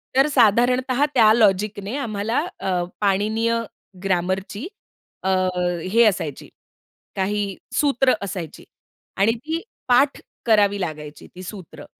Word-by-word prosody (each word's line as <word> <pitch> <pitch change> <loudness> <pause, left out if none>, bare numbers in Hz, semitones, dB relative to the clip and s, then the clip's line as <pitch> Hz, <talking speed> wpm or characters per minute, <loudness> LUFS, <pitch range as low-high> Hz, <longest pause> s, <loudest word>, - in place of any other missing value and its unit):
तर 270 +2 +5
साधारणतः 250 +3 +3
त्या 220 -4 +6
लॉजिक 210 -2 +2
ने 215 +7 -4
आम्हाला 225 -2 -1 0.2
अ, 180 -2 -1 0.2
पाणिनीय 215 +4 +1 0.5
ग्रामरची 190 - -2 0.6
अ, 190 - 0 0.6
हे 235 +1 +6
असायची. 170 -9 -1 0.7
काही 200 0 -1 0.2
सूत्र 270 -3 +3
असायची 185 -5 -6 0.5
आणि 200 +4 +4
ती 325 +2 -2 0.3
पाठ 270 +3 +3 0.3
करावी 205 -3 +3
लागायची 150 -3 -6
ती 185 - -9
सूत्र 175 -6 -10
210 Hz, 110 wpm, -22 LUFS, 190-240 Hz, 0.7 s, त्या